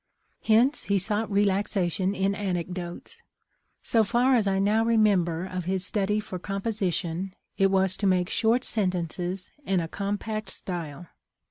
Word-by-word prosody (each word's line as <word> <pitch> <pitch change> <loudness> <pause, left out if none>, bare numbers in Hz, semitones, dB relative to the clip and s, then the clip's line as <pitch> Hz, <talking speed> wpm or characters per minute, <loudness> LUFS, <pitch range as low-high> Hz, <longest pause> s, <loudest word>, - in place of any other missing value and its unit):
Hence 235 +6 +3
he 200 - +2
sought 210 +3 0
relax 200 +1 +1
ation 185 +2 0
in 195 +1 +1
anecdotes. 180 -3 -4 0.6
So 225 -2 +3
far 245 +5 +3
as 220 -4 +2
I 195 -1 +2
now 210 +3 +2
remember 200 -7 +2
of 185 -2 -5
his 190 +1 0
study 210 +1 0
for 190 -3 -6
composition, 195 -3 -2 0.2
it 195 0 +3
was 190 -1 +2
to 200 - 0
make 180 -1 +2
short 230 +6 +2
sen 210 -7 +1
tences 180 +1 -3
and 195 -7 +1
a 165 - -2
compact 205 +3 -3
style. 170 -3 -6
195 Hz, 150 wpm, -26 LUFS, 180-210 Hz, 0.6 s, Hence